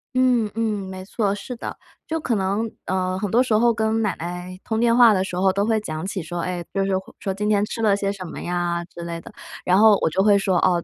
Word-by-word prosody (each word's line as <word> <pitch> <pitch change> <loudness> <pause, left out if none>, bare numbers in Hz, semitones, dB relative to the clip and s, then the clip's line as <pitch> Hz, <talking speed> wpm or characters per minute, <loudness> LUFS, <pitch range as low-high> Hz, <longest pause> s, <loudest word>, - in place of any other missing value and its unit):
嗯， 250 -4 +3
嗯， 210 -4 -1
没 185 0 -7
错， 205 -1 -1
是 245 +4 -7
的。 - - -6 0.3
就 325 0 -1
可 265 - -1
能， 205 +2 -1
呃， 185 0 -1
很 205 -1 -2
多 240 +5 +4
时 240 - -1
候 235 +2 +4
跟 220 0 0
奶 210 -5 0
奶 180 +2 -6
通 220 0 -2
电 235 0 +3
话 235 -3 +8
的 190 -1 +1
时 180 - -5
候 190 +1 +2
都 200 +1 +1
会 220 -1 +2
讲 155 -5 -5
起 195 -3 -4
说， 175 +2 -5
哎， 175 0 -3
就 195 - +1
是 195 -1 +1
会 190 - -9
说 195 - -2
今 210 +2 -2
天 205 -1 +3
吃 210 - -4
了 205 -2 +4
些 200 0 -1
什 190 -2 -7
么 165 - -7
呀 175 -1 -1
之 170 - -11
类 170 0 -5
的。 - - -12 0.3
然 180 +1 +3
后 210 -1 +6
我 - - +2
就 190 +5 +1
会 205 -1 +5
说： 195 -2 +2
“哦， 175 -2 +2
195 Hz, 285 characters per minute, -23 LUFS, 185-220 Hz, 0.3 s, 话